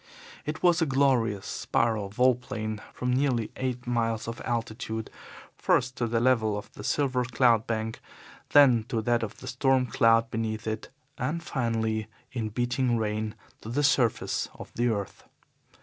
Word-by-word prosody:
It 150 +1 -4
was 175 -1 +4
a 165 - +3
glorious, 130 -7 +2
spiral 110 -4 0
vol 125 +5 +4
plane 110 -3 -5
from 125 0 -2
nearly 125 -4 +1
eight 125 -1 -3
miles 115 -2 -1
of 115 - -5
altitude 110 -1 -3 0.4
first, 125 +1 +1
to 120 - 0
the 115 0 +1
level 115 -4 +2
of 105 - -8
the 105 - -9
silver 130 0 +1
cloud 120 -2 +3
bank, 110 0 -2 0.5
then 130 -6 +6
to 115 -3 -2
that 120 +1 +2
of 110 -1 -5
the 130 - -10
storm 130 0 +2
cloud 115 -1 +3
beneath 110 -1 -2
it, 110 0 -4 0.3
and 160 +7 -2
finally, 110 -6 -1 0.2
in 115 -4 -3
beating 120 +2 0
rain, 110 0 -2 0.3
to 110 - -8
the 145 +5 0
surface 130 -6 +2
of - - -11
the 120 +1 +1
earth. 100 -4 -3
115 Hz, 160 wpm, -28 LUFS, 110-130 Hz, 0.5 s, then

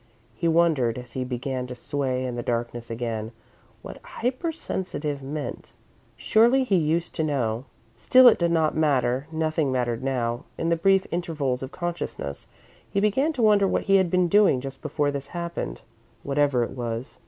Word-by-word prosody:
He 145 +9 -2
wondered, 160 -8 +2
as 125 -1 -8
he 130 - -3
began 125 0 -3
to 125 - -7
sway 130 -1 -2
in 125 -1 -3
the 120 - -3
darkness 120 0 -3
again, 115 -1 -3 0.5
what - - -9
"hypersensitive" 225 - -3
meant. 145 +2 -6 0.4
Surely, 240 +5 +4
he 210 -7 +1
used 165 0 0
to 160 - -1
know. 125 -5 -1 0.3
Still, 255 - +6
it 235 - +6
did 170 -1 +2
not 160 -2 +2
matter 135 -4 +1
nothing 155 -3 0
mattered 120 -2 -1
now. 120 -3 -1
In 165 - -1
the 170 - +3
brief 195 +3 +3
intervals 150 -7 -2
of 130 +1 -6
consciousness, 175 - -5 0.4
he 200 - 0
began 235 +10 +2
to 250 -5 -1
wonder 205 -2 +5
what - - 0
he 195 0 +4
had 190 -2 +2
been 180 0 +2
doing 200 -7 +4
just 135 +1 -8
before 145 -1 0
this 140 -1 -5
happened, 170 - -4 0.4
whatever 140 -3 +2
it - - -4
was. 120 0 -5
145 Hz, 170 wpm, -25 LUFS, 125-175 Hz, 0.5 s, Still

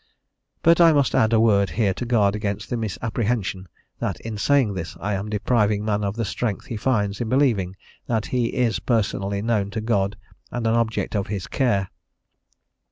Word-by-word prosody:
But 170 +1 +5
I 165 -1 +7
must 140 -3 +2
add 110 - +3
a 115 - +4
word 100 -3 +4
here 105 -4 +1
to 125 - -5
guard 105 -4 +3
against 105 +1 -3
the - - +1
misapprehension 110 -3 -2 0.3
that - - -2
in 115 -1 -5
saying 125 0 +2
this 85 -3 -6
I 105 +2 -2
am 100 +2 -3
depriving 105 -1 +1
man 105 -1 0
of 100 0 -2
the 115 -1 -1
strength 105 0 -3
he 115 - -5
finds 105 -3 0
in 115 - -2
believing 115 -9 +2 0.3
that 110 -2 0
he 125 -2 +2
is 120 -2 0
personally 100 -3 -1
known 110 -4 0
to 110 - -4
God 100 -3 0 0.3
and 120 -1 -4
an 115 - +3
object 115 -1 0
of 100 -2 -1
his 100 -3 -4
care. 100 -8 0
110 Hz, 185 wpm, -23 LUFS, 100-120 Hz, 0.3 s, I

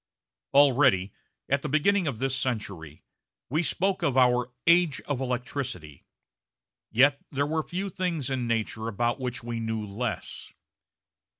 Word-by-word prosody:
Already, 130 -9 +5 0.3
at 140 0 +1
the - - -4
beginning 175 +5 +2
of 140 - -2
this 135 +2 -1
century, 100 - -4 0.5
we 155 +4 +2
spoke 190 +4 0
of 135 -2 +1
our 125 -1 +3
"age 170 -5 +4
of 140 -3 -3
electricity," 125 - -4 0.8
yet 135 +5 +4
there 140 +1 0
were 160 +2 0
few 185 +5 -4
things 175 -8 -2
in 125 -2 -1
nature 115 -1 -2
about 120 +4 -1
which 125 -2 -4
we 120 -1 -4
knew 110 -1 -3
less. 105 +3 -5
130 Hz, 135 wpm, -27 LUFS, 115-145 Hz, 0.8 s, Already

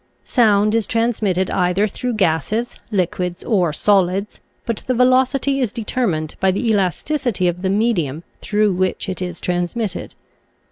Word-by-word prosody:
Sound 215 -3 +3
is 225 -3 +1
transmitted 215 -5 0
either 180 +3 +2
through 245 +4 -3
gases, 205 - 0
liquids, 180 -3 -2
or 185 -8 +1
solids, 195 +3 +1 0.3
but 230 -2 -2
the 255 - +1
velocity 260 +2 +3
is 245 -6 0
deter 235 +2 -1
mined 155 -4 -2
by 190 - +3
the 200 +5 0
elasticity 205 - 0
of 175 0 -2
the 190 - 0
medium 185 - 0 0.2
through 210 -1 +1
which 185 +2 -1
it 185 -1 -4
is 180 -1 -4
transmitted. 180 +3 -3
200 Hz, 145 wpm, -19 LUFS, 180-230 Hz, 0.3 s, Sound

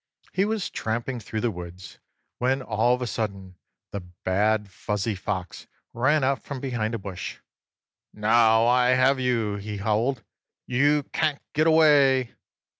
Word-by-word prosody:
He 195 - +2
was 215 -2 -2
tramping 120 +3 -3
through 110 0 -5
the 120 - 0
woods 90 0 -10 0.4
when, 130 +2 +1
all 115 +2 +2
of 125 - -5
a - - -1
sudden, 100 -4 -4 0.4
the 100 - -3 0.3
bad 105 +2 +1
Fuzzy 105 +6 -2
Fox 95 -1 -5 0.3
ran 135 +5 +2
out 135 0 +1
from 140 -2 -6
behind 120 -4 -2
a - - -1
bush. 95 -3 -6 0.7
"Now 110 +1 +4
I 125 +1 +4
have 130 +1 +3
you!" 115 -5 0
he 105 +1 -6
howled. 110 +5 0 0.4
"You 145 +4 +2
can't 155 -3 0
get 155 +2 +2
away!" 145 -6 +4
115 Hz, 145 wpm, -25 LUFS, 105-135 Hz, 0.7 s, Now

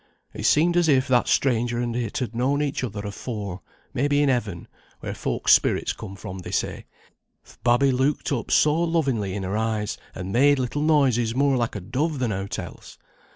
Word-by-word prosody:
It - - -1
seemed 170 +3 +3
as 175 -2 +3
if 135 -1 +3
that 125 -2 +3
stranger 120 -2 +1
and 120 -1 -2
it 120 -3 -3
had 125 -4 -3
known 135 +5 +1
each 140 -2 -2
other 105 -4 -4
afore, 100 -2 -6 0.3
maybe 145 +2 +2
in 145 - +2
Heaven, 110 -9 -2 0.3
where - - -5
folk's - - +1
spirits - - +2
come 95 - -9
from 95 -1 -8
they 90 - -8
say; - - -2 0.6
th' - - -20
babby 120 +3 +4
looked 135 +4 0
up 125 -5 -2
so 155 +2 +3
lovingly 135 - 0
in 100 - -3
her 95 +2 -3
eyes, 110 -1 -2 0.2
and 90 +1 -5
made 140 +4 +5
little 130 +3 -2
noises 130 -7 +2
more 140 0 +3
like 120 -3 -1
a - - -3
dove 140 - -2
than 125 -4 -1
aught 95 +1 -4
else. - - -9
125 Hz, 195 wpm, -24 LUFS, 105-140 Hz, 0.6 s, made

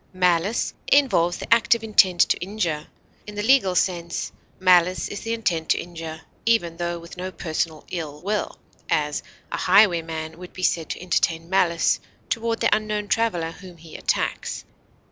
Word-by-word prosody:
Malice 180 +3 +1
involves 190 -12 +3
the - - +2
active 230 0 +3
intent 190 -5 +4
to - - +4
injure; 175 -5 -3 0.4
in 210 - -8
the 205 - -2
legal 220 -7 +4
sense, 170 -2 -1 0.3
malice 180 -1 +4
is 205 - -5
the 225 - -5
intent 180 -9 -1
to - - +4
injure, 165 -2 -7 0.2
even 195 -8 +1
tho 175 0 -2
with 170 +1 -11
no 185 +1 -4
personal 160 -2 -3
ill 155 -4 -5
will; 210 +2 -2 0.3
as, - - 0 0.3
a - - -2
highwayman 165 -5 +2
would 180 0 -10
be 185 - -7
said 165 -3 +1
to - - -4
entertain 170 -1 0
malice 170 -3 +2 0.3
toward 230 0 -1
the - - +4
unknown 210 -1 -2
traveler 175 -8 0
whom 180 0 -13
he 160 0 -13
attacks. - - -2
180 Hz, 160 wpm, -23 LUFS, 165-210 Hz, 0.4 s, intent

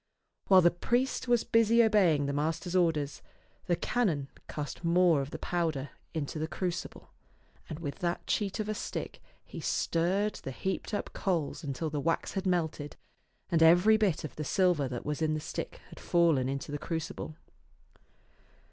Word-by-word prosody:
While 190 -1 +7
the 175 - +6
priest 245 +8 0
was 240 -1 +3
busy 230 +1 +4
obeying 185 -10 +4
the 140 - -1
master's 160 +5 -1
orders, 155 -5 +1 0.5
the 175 - +3
canon 165 - 0 0.2
cast 150 +3 -5
more 170 -3 +4
of 135 - -5
the - - -6
powder 160 -6 -2 0.2
into 155 0 -3
the 155 - -1
crucible, 175 +1 -4 0.6
and 155 - -5
with 150 -1 -5
that 175 -2 -2
cheat 205 0 -1
of 215 - -2
a 215 - -1
stick - - -5 0.2
he - - -8
stirred 190 +5 0
the - - -5
heaped 190 - -3
up - - -4
coals 170 -7 -1
until 145 +2 -3
the 150 - -2
wax 165 +3 -1
had 195 -1 -2
melted 160 -5 -1 0.6
and 165 -1 +3
every 175 +7 +7
bit 210 -7 +1
of 155 - -7
the 155 - -3
silver 175 -3 +2
that 125 -1 -5
was 150 +1 -2
in 155 -1 +1
the - - -2
stick - - -5
had - - -12
fallen 165 -7 +2
into 140 +1 -4
the 145 - -3
crucible. 160 -1 -4
165 Hz, 170 wpm, -30 LUFS, 150-190 Hz, 0.6 s, While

